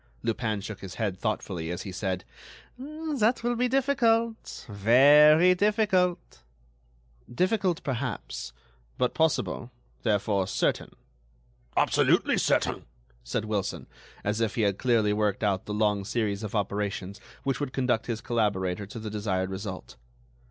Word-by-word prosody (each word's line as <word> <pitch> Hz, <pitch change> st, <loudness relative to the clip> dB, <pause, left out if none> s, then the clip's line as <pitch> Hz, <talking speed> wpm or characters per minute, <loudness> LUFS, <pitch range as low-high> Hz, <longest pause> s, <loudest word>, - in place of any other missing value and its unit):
Lupin 110 Hz, -2 st, -1 dB
shook 105 Hz, 0 st, -7 dB
his 95 Hz, -2 st, -8 dB
head 100 Hz, -5 st, -2 dB
thoughtfully, 95 Hz, -6 st, -3 dB
as 90 Hz, -, -4 dB
he 95 Hz, -, -6 dB
said: 95 Hz, -1 st, -3 dB, 0.5 s
"That 285 Hz, -5 st, -1 dB
will 240 Hz, 0 st, +1 dB
be 250 Hz, +1 st, +1 dB
difficult—very 180 Hz, -, +4 dB
difficult." 185 Hz, -3 st, +1 dB, 0.9 s
"Difficult, 185 Hz, -, 0 dB
perhaps, 125 Hz, -, -4 dB, 0.5 s
but 125 Hz, -, +1 dB
possible, 160 Hz, -6 st, 0 dB, 0.3 s
therefore 100 Hz, -3 st, +1 dB
certain—" -, -, -1 dB, 0.8 s
"Absolutely -, -, +3 dB
certain," -, -, +1 dB, 0.4 s
said 65 Hz, -, -2 dB
Wilson, 105 Hz, -3 st, -2 dB, 0.4 s
as 105 Hz, +2 st, -1 dB
if 110 Hz, -2 st, 0 dB
he 115 Hz, -, 0 dB
had 100 Hz, -2 st, +1 dB
clearly 115 Hz, -4 st, +2 dB
worked 105 Hz, 0 st, 0 dB
out 100 Hz, -3 st, 0 dB
the -, -, -4 dB
long 105 Hz, -1 st, +1 dB
series 105 Hz, -1 st, -1 dB
of 110 Hz, 0 st, -5 dB
operations 100 Hz, -1 st, -2 dB, 0.2 s
which 135 Hz, -2 st, -1 dB
would 145 Hz, -3 st, -3 dB
conduct 125 Hz, -4 st, 0 dB
his 115 Hz, -2 st, -3 dB
collaborator 100 Hz, -4 st, -1 dB
to 105 Hz, -, -9 dB
the 110 Hz, -1 st, -6 dB
desired 95 Hz, -3 st, -2 dB
result. 95 Hz, -1 st, -7 dB
110 Hz, 130 wpm, -27 LUFS, 100-160 Hz, 0.9 s, difficult—very